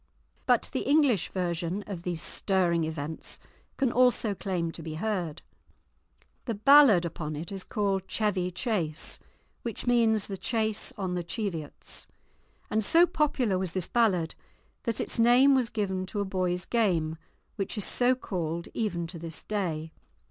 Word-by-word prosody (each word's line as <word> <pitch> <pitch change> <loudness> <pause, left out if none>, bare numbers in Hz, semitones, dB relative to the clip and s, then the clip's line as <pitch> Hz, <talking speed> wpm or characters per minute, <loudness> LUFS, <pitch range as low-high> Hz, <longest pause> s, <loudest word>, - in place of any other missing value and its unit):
But - - +3
the - - 0
English 280 - +3
version 175 +1 -2
of 195 -5 -6
these 175 -2 -3
stirring 175 -4 +2
events 155 0 -5 0.4
can 265 -3 +2
also 245 -4 +3
claim 180 -4 -2
to 165 - -8
be 160 -1 -6
heard; 175 -4 -3 1.0
the 230 - -2
ballad 235 -5 +7
upon 155 -2 -4
it 160 +5 -6
is 195 -2 -5
called 195 -2 -1
Chevy 195 -4 0
Chase, 175 - -2 0.4
which 230 -3 -3
means 230 -4 +3
the 195 - -5
Chase 220 0 0
on 190 -3 -2
the 175 -1 -2
Cheviots; 170 -5 -5 0.6
and 220 +1 +1
so 335 +10 +6
popular 275 - +1
was 185 -3 -3
this 185 -2 -2
ballad 190 -9 +2 0.5
that 230 -2 0
its - - -1
name 245 +4 +6
was 255 -3 +2
given 190 -4 -2
to 205 - -4
a 200 - 0
boys' 180 -2 -1
game, 175 -9 +1 0.4
which 200 +2 -2
is 210 - +1
so 250 +1 +3
called 170 -8 -4
even 185 -7 -1
to 165 0 -8
this 165 -1 -8
day. 165 -7 -2
190 Hz, 155 wpm, -28 LUFS, 170-225 Hz, 1.0 s, ballad